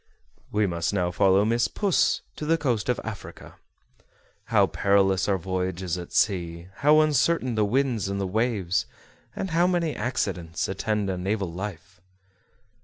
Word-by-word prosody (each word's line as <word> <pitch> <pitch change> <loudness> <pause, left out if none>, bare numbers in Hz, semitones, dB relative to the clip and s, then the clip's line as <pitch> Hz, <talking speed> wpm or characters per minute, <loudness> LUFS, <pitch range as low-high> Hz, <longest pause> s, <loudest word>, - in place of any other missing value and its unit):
We 105 0 +2
must 85 -1 -1
now 90 -2 0
follow 95 +2 +3
Miss 115 +1 +2
Puss 195 - +1
to - - -7
the 165 +1 +3
coast 120 -8 -1
of 125 - +1
Africa. 105 -4 -9 0.9
How - - +4
perilous 95 -1 +2
are 100 - +2
voyages 90 -1 -2
at 90 -1 -7
sea, 85 -4 0
how 150 +2 +5
uncertain 150 -3 +2
the 110 -1 +2
winds 120 -3 0
and 100 0 -2
the 100 - -1
waves, 100 -3 0 0.5
and 190 - -4
how 170 +2 +3
many 170 -4 0
accidents 90 -9 -2
attend 105 +1 -1
a 90 - -4
naval 95 -2 -2
life! 95 0 -7
100 Hz, 150 wpm, -25 LUFS, 95-120 Hz, 0.9 s, how